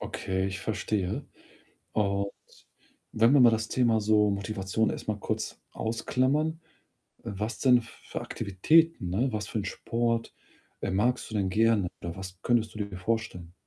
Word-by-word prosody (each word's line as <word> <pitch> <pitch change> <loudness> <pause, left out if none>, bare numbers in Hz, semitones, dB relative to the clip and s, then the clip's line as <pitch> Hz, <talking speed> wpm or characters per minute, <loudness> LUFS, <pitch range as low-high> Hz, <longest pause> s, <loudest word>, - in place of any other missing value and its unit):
Okay, 95 0 -2
ich 95 -1 -4
verstehe. 105 -3 -2 0.7
Und 100 -1 +1 0.8
wenn 115 +5 +4
wir 145 - +7
mal 120 -2 +8
das 110 0 0
Thema 120 -3 +2
so 105 0 +4
Motivation 100 +2 -1
erst - - -5
mal 105 -1 0
kurz - - -3
ausklammern, 130 +8 0 0.6
äh, - - -30
was 110 +3 -3
denn 125 -3 +5
für 115 - -8
Aktivitäten 155 - +2
ne, 120 +7 +1
was 105 -1 -3
für 110 - -2
'n 100 - -2
Sport, 115 +4 -1 0.5
äh, 100 - -2
magst 120 +6 +1
du - - -7
denn 95 -2 +1
gerne 110 -2 +3
oder 85 +1 -5
was 90 -1 -8
könntest 115 -3 +1
du - - -7
dir 100 -2 -8
vorstellen? 90 -4 -3
110 Hz, 160 wpm, -28 LUFS, 95-115 Hz, 0.8 s, mal